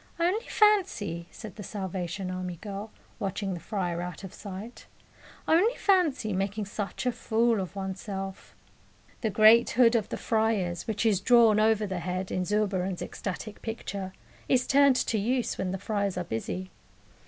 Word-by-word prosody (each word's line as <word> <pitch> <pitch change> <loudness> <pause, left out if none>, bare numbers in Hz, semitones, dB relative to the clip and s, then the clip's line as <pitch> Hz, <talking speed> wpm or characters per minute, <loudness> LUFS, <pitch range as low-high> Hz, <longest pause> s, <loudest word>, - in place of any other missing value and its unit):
"Only 370 +7 +1
fancy," 355 - +2
said 220 -2 -10
the - - -6
Salvation 185 -1 -4
Army 185 -1 -4
girl, 200 +4 -7 0.3
watching 195 -1 -2
the 175 - -5
friar 175 -1 -2
out 180 +1 -6
of 190 - -8
sight, 205 +3 -9 0.6
"only 395 +10 +4
fancy 325 - +2
making 200 +3 -1
such 205 +4 -4
a 250 - +3
fool 230 -1 +1
of 185 +1 -6
one's 190 -1 -4
self!" 195 -2 -6 0.7
The 220 - +1
great 220 +3 +6
hood 240 -1 +4
of 220 -3 0
the - - -3
friars, 220 -6 0
which 220 0 -1
is 205 -4 +3
drawn 230 -1 +6
over 215 0 +3
the 190 -3 -3
head 185 +2 -3
in 185 - -1
Zurbaran's 195 -3 0
ecstatic 205 +2 -6
picture, 200 -4 -5 0.4
is 250 -1 +3
turned 280 -1 +5
to 225 -3 +1
use 245 +4 0
when 190 - -1
the 190 - -2
friars 200 -2 -2
are 180 - -1
busy. 180 +8 -4
205 Hz, 165 wpm, -28 LUFS, 185-230 Hz, 0.7 s, great